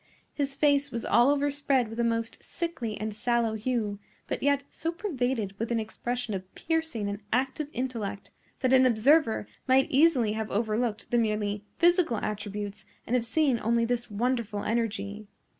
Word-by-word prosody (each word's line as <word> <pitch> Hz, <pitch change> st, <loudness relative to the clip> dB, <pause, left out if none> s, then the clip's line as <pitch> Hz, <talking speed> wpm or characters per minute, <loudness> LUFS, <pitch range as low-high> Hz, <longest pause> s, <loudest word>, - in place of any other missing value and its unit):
His 280 Hz, -2 st, -2 dB
face 285 Hz, -1 st, +3 dB
was 235 Hz, -3 st, -4 dB
all 240 Hz, +3 st, +5 dB
overspread 285 Hz, -3 st, +1 dB
with 225 Hz, +2 st, -7 dB
a -, -, +3 dB
most 230 Hz, -1 st, -1 dB
sickly 315 Hz, -11 st, -4 dB
and 215 Hz, 0 st, -3 dB
sallow 230 Hz, +1 st, +1 dB
hue, 220 Hz, -2 st, -2 dB, 0.3 s
but -, -, -3 dB
yet 280 Hz, 0 st, +2 dB
so 330 Hz, -, -2 dB
pervaded 260 Hz, -, -2 dB
with 230 Hz, +1 st, -2 dB
an 230 Hz, -, +2 dB
expression 240 Hz, +1 st, -3 dB
of 185 Hz, -1 st, -6 dB
piercing 320 Hz, -10 st, -1 dB
and 200 Hz, +1 st, -4 dB
active 265 Hz, +4 st, 0 dB
intellect 230 Hz, -7 st, -4 dB, 0.3 s
that 255 Hz, -1 st, +3 dB
an 260 Hz, 0 st, +7 dB
observer 245 Hz, +1 st, +3 dB, 0.2 s
might 265 Hz, +1 st, +4 dB
easily 270 Hz, -6 st, +4 dB
have 220 Hz, 0 st, -3 dB
overlooked 220 Hz, +1 st, -1 dB
the 240 Hz, -, +4 dB
merely 210 Hz, -2 st, -1 dB
physical 345 Hz, -, +3 dB
attributes 205 Hz, -1 st, -4 dB, 0.2 s
and 245 Hz, -, 0 dB
have 235 Hz, -2 st, +1 dB
seen 270 Hz, -2 st, +2 dB
only 230 Hz, +1 st, +2 dB
this 240 Hz, 0 st, -1 dB
wonderful 220 Hz, -1 st, -1 dB
energy. 215 Hz, -2 st, -2 dB
235 Hz, 160 wpm, -28 LUFS, 215-270 Hz, 0.3 s, an